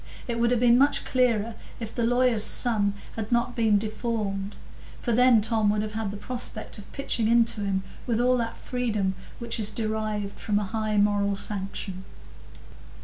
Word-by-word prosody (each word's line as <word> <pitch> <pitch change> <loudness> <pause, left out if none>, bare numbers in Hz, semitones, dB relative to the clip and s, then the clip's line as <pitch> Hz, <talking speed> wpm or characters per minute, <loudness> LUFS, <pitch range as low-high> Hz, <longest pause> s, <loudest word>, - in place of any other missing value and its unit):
It 235 -1 -2
would 235 0 +3
have 245 -1 +2
been 245 0 +5
much 285 +2 +3
clearer 230 -3 +1 0.3
if 225 -1 -6
the 235 - -1
lawyer's 245 -2 +3
son 210 -5 +3 0.2
had 220 0 -4
not 235 0 +1
been 220 -4 +3
deformed, 210 -2 -3 0.4
for 240 - -2
then 245 -1 +5
Tom 220 -1 +1
would 210 0 +1
have 215 - -4
had 220 -1 -3
the 200 - -6
prospect 240 -1 -5
of 200 - -13
pitching 245 -5 -1
into 230 -2 +3
him 195 -1 -1 0.2
with 230 -2 +1
all 250 +1 +4
that 230 -1 -3
freedom 215 -6 -1 0.2
which 235 0 -3
is 210 -1 +2
derived 215 -2 -3
from 210 -1 0
a 210 - +1
high 215 +1 -2
moral 205 -1 +2
sanction. 195 -1 -4
220 Hz, 175 wpm, -26 LUFS, 205-235 Hz, 0.4 s, been